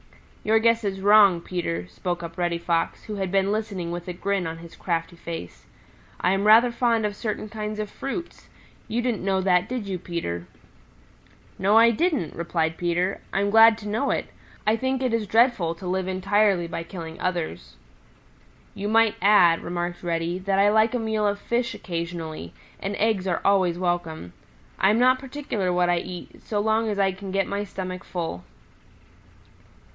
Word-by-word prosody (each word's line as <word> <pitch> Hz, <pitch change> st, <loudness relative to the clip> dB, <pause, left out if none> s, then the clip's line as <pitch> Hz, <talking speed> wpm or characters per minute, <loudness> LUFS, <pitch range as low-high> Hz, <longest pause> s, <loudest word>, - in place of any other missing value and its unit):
"Your 220 Hz, +1 st, +3 dB
guess 230 Hz, 0 st, +3 dB
is 195 Hz, -2 st, -2 dB
wrong, 200 Hz, -3 st, +6 dB
Peter," 90 Hz, -, -3 dB
spoke 175 Hz, -, -4 dB
up 165 Hz, 0 st, -7 dB
Reddy 175 Hz, -1 st, 0 dB
Fox, 170 Hz, -1 st, -1 dB
who 210 Hz, -1 st, -6 dB
had 190 Hz, -2 st, -2 dB
been 195 Hz, 0 st, +2 dB
listening 200 Hz, -5 st, -3 dB
with 175 Hz, +1 st, -6 dB
a 180 Hz, -, -3 dB
grin 190 Hz, 0 st, -1 dB
on 160 Hz, 0 st, -5 dB
his 165 Hz, 0 st, -12 dB
crafty 170 Hz, 0 st, -3 dB
face. 165 Hz, -, -8 dB, 0.5 s
"I 180 Hz, -, +2 dB
am 195 Hz, +2 st, +1 dB
rather 230 Hz, +3 st, +7 dB
fond 235 Hz, -2 st, +1 dB
of 205 Hz, -1 st, -2 dB
certain 215 Hz, 0 st, -4 dB
kinds 215 Hz, 0 st, -5 dB
of 215 Hz, -1 st, -4 dB
fruits. 340 Hz, +6 st, -6 dB, 0.4 s
You 240 Hz, +2 st, -1 dB
didn't 240 Hz, -7 st, -1 dB
know 190 Hz, -1 st, +1 dB
that, 180 Hz, -1 st, +2 dB
did 250 Hz, -4 st, -3 dB
you, 190 Hz, -2 st, -4 dB
Peter?" 90 Hz, -, -4 dB, 1.1 s
"No, 200 Hz, +3 st, +4 dB
I 230 Hz, +1 st, +7 dB
didn't," 275 Hz, -, 0 dB
replied 165 Hz, -1 st, -1 dB
Peter. 175 Hz, +2 st, -1 dB
"I'm 200 Hz, +1 st, 0 dB
glad 225 Hz, 0 st, +7 dB
to 210 Hz, -2 st, -8 dB
know 225 Hz, +7 st, 0 dB
it. -, -, -1 dB, 0.4 s
I 215 Hz, +1 st, +3 dB
think 260 Hz, +2 st, -1 dB
it 250 Hz, -3 st, 0 dB
is 225 Hz, -2 st, 0 dB
dreadful 225 Hz, -7 st, +3 dB
to 175 Hz, -, -11 dB
live 185 Hz, +1 st, -1 dB
entirely 195 Hz, 0 st, +2 dB
by 165 Hz, -, -4 dB
killing 165 Hz, -2 st, -8 dB
others." 155 Hz, -, -3 dB, 1.0 s
"You 200 Hz, -, -4 dB
might 225 Hz, -1 st, +4 dB
add," 185 Hz, -5 st, +5 dB
remarked 175 Hz, 0 st, -4 dB
Reddy, 170 Hz, +1 st, -2 dB
"that 195 Hz, +1 st, 0 dB
I 200 Hz, +1 st, +5 dB
like 220 Hz, +2 st, +3 dB
a -, -, 0 dB
meal 220 Hz, -2 st, 0 dB
of 205 Hz, 0 st, 0 dB
fish 235 Hz, +3 st, -2 dB
occasionally, 165 Hz, -, -5 dB, 0.2 s
and 200 Hz, +1 st, -3 dB
eggs 205 Hz, -3 st, 0 dB
are 175 Hz, -, 0 dB
always 185 Hz, -4 st, +3 dB
welcome. 175 Hz, -, -2 dB, 0.5 s
I 190 Hz, -, +4 dB
am 215 Hz, -, +3 dB
not 255 Hz, +1 st, +4 dB
particular 260 Hz, -8 st, -3 dB
what 175 Hz, 0 st, +2 dB
I 175 Hz, -, +2 dB
eat 180 Hz, 0 st, -9 dB
so 210 Hz, -, -2 dB
long 220 Hz, +1 st, +1 dB
as 205 Hz, -, -2 dB
I 195 Hz, -1 st, +3 dB
can 190 Hz, +1 st, -8 dB
get 195 Hz, 0 st, +1 dB
my 200 Hz, +2 st, -3 dB
stomach 185 Hz, -2 st, -6 dB
full." 165 Hz, -, -5 dB
195 Hz, 180 wpm, -25 LUFS, 175-215 Hz, 1.1 s, rather